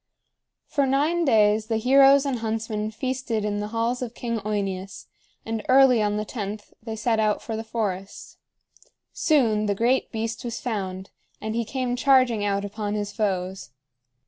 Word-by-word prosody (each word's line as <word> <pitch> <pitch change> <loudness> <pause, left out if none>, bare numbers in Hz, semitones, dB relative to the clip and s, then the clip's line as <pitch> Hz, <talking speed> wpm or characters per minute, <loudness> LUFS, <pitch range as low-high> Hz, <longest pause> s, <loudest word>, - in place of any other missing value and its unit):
For 280 -2 0
nine 305 +6 +1
days 215 -3 +3
the 225 -1 0
heroes 270 +4 +6
and 265 -4 -1
huntsmen 220 -1 -2
feasted 245 -2 -3
in 205 0 -1
the 210 - -3
halls 230 +3 -1
of 240 -2 -5
King 235 -2 -3
OEneus, 195 -2 -4 0.4
and 225 -1 -3
early 260 -3 +6
on 210 0 0
the 210 - -2
tenth 210 -2 -6
they 225 0 -5
set 225 0 0
out 215 -1 +2
for 225 - -5
the 220 - -4
forest. 205 -4 -5 0.7
Soon 225 -9 +2
the 200 - +1
great 240 +5 +1
beast 225 -1 -3
was 240 -1 -4
found, 190 -5 -4 0.3
and 220 0 -4
he 235 +1 0
came 250 +2 -2
charging 255 -4 +3
out 200 0 0
upon 205 0 -4
his 205 -1 -3
foes. 190 - -2
220 Hz, 165 wpm, -24 LUFS, 210-245 Hz, 0.7 s, heroes